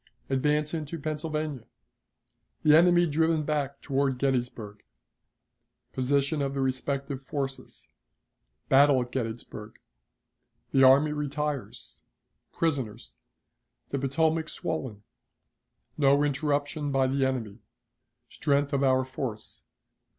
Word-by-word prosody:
Advance 150 +3 +1
into 160 0 -4
Pennsylvania. 150 -4 -4 1.0
The 150 0 +6
Enemy 175 +1 +5
driven 160 0 +1
back 145 -2 -2
toward 135 -2 0
Gettysburg. 125 -6 -2 1.1
Position 140 +3 +1
of 140 0 -2
the - - -2
Respective 135 +1 -2
Forces. 135 0 -6 0.8
Battle 140 0 +5
at 120 - -12
Gettysburg. 115 -3 -5 0.9
The 135 - +3
Army 140 +3 +6
Retires. 150 -1 -4 0.5
Prisoners. 130 -9 -3 0.7
The 140 - -1
Potomac 160 +4 0
swollen. 125 -10 -4 1.0
No 140 0 +4
Interruption 145 0 -1
by 135 -1 +2
the 135 +1 0
Enemy. 120 -5 -2 0.7
Strength 140 0 0
of 140 0 +1
our 130 -1 +3
Force. 125 -4 -6
140 Hz, 100 wpm, -27 LUFS, 130-150 Hz, 1.1 s, The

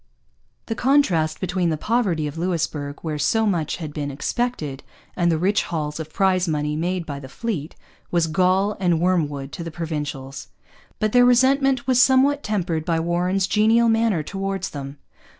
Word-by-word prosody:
The - - -3
contrast 195 - +2
between 180 -1 0
the 155 - -1
poverty 195 -6 0
of 145 0 -5
Louisbourg, 160 -4 -2
where 155 -2 -3
so 220 +10 +2
much 170 -7 0
had 155 -4 -7
been 145 -2 -3
expected, 145 - -3 0.3
and 175 -1 +2
the 160 - +1
rich 195 +5 +2
hauls 150 -2 -3
of 155 -1 -6
prize 185 -1 +2
money 150 -1 -1
made 175 +2 -2
by 140 -2 -5
the 135 -1 -10
fleet, 175 - -4 0.3
was 170 -2 +2
gall 185 +5 +2
and 175 -4 +2
wormwood 150 -6 0
to 170 - -6
the 165 - -5
Provincials. 150 -5 -5 0.5
But 215 -1 0
their 245 +1 +6
resentment 260 +1 +3
was 255 -1 +4
somewhat 270 +2 +4
tempered 180 - -2
by 165 -1 0
Warren's 180 +3 0
genial 220 +4 +3
manner 225 -7 +2
towards 195 +2 -4
them. 140 0 -7
175 Hz, 170 wpm, -22 LUFS, 155-215 Hz, 0.5 s, their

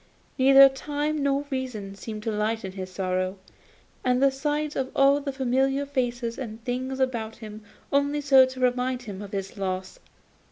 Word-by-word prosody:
Neither 275 +1 +9
time 290 +2 -2
nor 280 0 +1
reason 245 -7 -4
seemed 215 +2 -7
to 225 - -1
lighten 210 -1 -2
his 185 -1 -7
sorrow, 185 0 -2 0.7
and 250 0 +2
the 275 0 +4
sight 295 +2 -2
of 260 -1 -1
all 275 +1 +4
the 280 -1 -3
familiar 270 +1 +1
faces 245 -4 -2
and 225 -4 -6
things 260 +2 -3
about 235 -4 -1
him 215 -1 -10 0.3
only 285 +1 +2
served 265 -2 +5
to 260 - -10
remind 250 0 0
him 200 -4 -7
of 200 -1 -8
his 195 -1 -5
loss. 185 -1 -4
255 Hz, 165 wpm, -26 LUFS, 215-275 Hz, 0.7 s, Neither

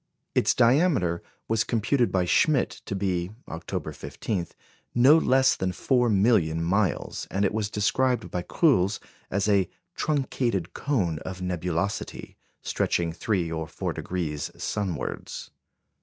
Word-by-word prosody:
Its - - +3
diameter 125 - +3 0.3
was 110 0 +2
computed 120 +2 +1
by 95 -2 +2
Schmidt 135 - +3 0.2
to 100 - -2
be, 90 -3 -1 0.2
October 80 - -5
15, 95 -6 -4 0.5
no 130 +5 +7
less 130 -4 +4
than 95 0 -1
four 125 +4 +2
million 95 -6 +3
miles, 95 +1 0
and 100 +1 +1
it 95 - 0
was 105 -2 -1
described 125 +5 +1
by 90 - -1
Cruls 100 - +2 0.3
as 100 +2 0
a 100 -3 +3 0.2
"truncated 125 - -1
cone 95 - 0
of 95 +1 -6
nebulosity," 90 +2 -3 0.3
stretching 85 -1 0
3° 85 -3 -1
or 80 0 -3
4° 80 -5 -4
sunwards. 90 -10 -4
100 Hz, 125 wpm, -26 LUFS, 90-120 Hz, 0.5 s, no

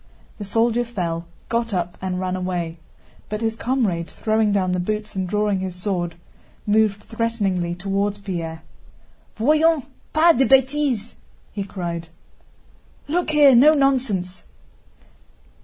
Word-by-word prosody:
The 205 - -5
soldier 230 +3 +2
fell, 175 -8 -4 0.2
got 230 -3 -1
up, 175 0 -2
and 185 -1 -2
ran 185 0 -2
away. 175 -3 -3 0.5
But 215 +1 -3
his 225 -1 0
comrade, 225 -10 -1
throwing 220 -1 +1
down 190 -2 +1
the 180 - 0
boots 210 +3 -3
and 190 -1 -2
drawing 210 -1 +1
his 185 -1 -4
sword, 180 -3 -2 0.5
moved 210 -1 +2
threateningly 200 -7 -1
toward 200 +2 -1
Pierre. 165 -4 -4 0.7
"Voyons, 305 +5 +3 0.3
pas 330 +2 +5
de 265 +2 +3
bêtises!" 265 -4 +2 0.2
* - - -33
he 200 - -3
cried. 170 -4 -5 0.5
* - - -32
"Look 355 -2 +1
here, 295 -3 +6
no 280 +6 +7
nonsense!" 245 -11 0
205 Hz, 135 wpm, -22 LUFS, 180-235 Hz, 0.7 s, no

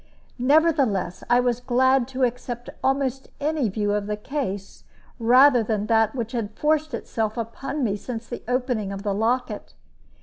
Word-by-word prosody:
Nevertheless, 265 - +2
I 245 0 +5
was 245 -1 0
glad 260 0 +3
to 265 0 -2
accept 245 0 -2
almost 270 -1 0
any 295 -5 0
view 205 +1 -1
of 205 -1 -1
the 210 0 -2
case 210 -5 -5 0.4
rather 250 +2 +6
than 215 -2 -1
that 225 +1 +2
which 230 -3 -3
had 220 -3 -4
forced 310 0 +1
itself 220 0 -3
upon 270 +5 -4
me 205 -4 +1
since 225 +2 -6
the 240 - -6
opening 245 -5 -1
of 195 0 -6
the 205 -2 0
locket. 235 +5 -1
240 Hz, 160 wpm, -24 LUFS, 215-265 Hz, 0.4 s, rather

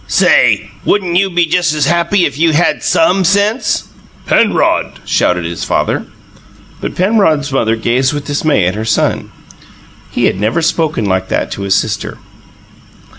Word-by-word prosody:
"Say, - - +2
wouldn't 185 -4 0
you 195 +2 +2
be 175 -1 +1
just 165 -1 0
as 150 - +1
happy 170 +2 +1
if - - -3
you 160 +2 +2
had 170 +4 +1
SOME 320 -13 +2
sense?" 205 +6 +1 0.4
"Penrod!" - - +1
shouted 90 -1 0
his 85 0 -5
father. - - -1 0.7
But - - -5
Penrod's 180 -8 +1
mother 115 -4 +1
gazed 120 +4 0
with 145 -1 -5
dismay 145 - 0
at 90 - 0
her 110 +1 -4
son: 110 -1 -1 0.8
he - - -1
had 95 - 0
never 110 +3 -1
before 165 +2 +1
spoken 155 -9 -1
like 95 -1 -1
that - - -2
to - - -5
his 100 -1 +1
sister. 110 -1 -2
155 Hz, 160 wpm, -13 LUFS, 110-180 Hz, 0.8 s, Say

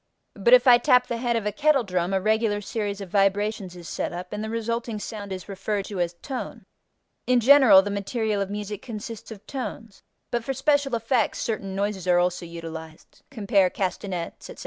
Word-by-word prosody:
But 485 +1 +6
if - - +3
I 245 -2 +8
tap 250 -1 +4
the 235 - -3
head 240 -1 0
of 225 -2 -1
a 210 - 0
kettle 280 +4 +3
drum, 180 -2 -1
a 195 - +2
regular 215 +1 +1
series 205 -1 -4
of 190 -3 -8
vibrations 200 -1 +1
is 175 -1 -10
set - - -3
up 180 +2 -7
and 210 +1 -3
the 220 - -4
resulting 230 0 -3
sound 205 -1 -7
is 185 -1 -6
referred 200 0 -3
to 200 -3 -6
as 175 0 -1
tone. 265 -3 -6 0.6
In 250 -1 +4
general 245 -6 +7
the 205 - -3
material 205 +1 -1
of 195 - -2
music 205 0 -5
consists 225 -1 -7
of 215 -3 -11
tones, 230 -6 -7 0.3
but 240 -1 -1
for 270 +3 -3
special 280 -1 +2
effects 230 -1 0
certain 195 -4 -3
noises 200 -2 -2
are 180 -1 +4
also 175 0 0
utilized 160 -1 -9
(cf. 200 -6 +1
castanets, 185 -2 -4
etc.). - - -9
210 Hz, 195 wpm, -25 LUFS, 190-235 Hz, 0.6 s, I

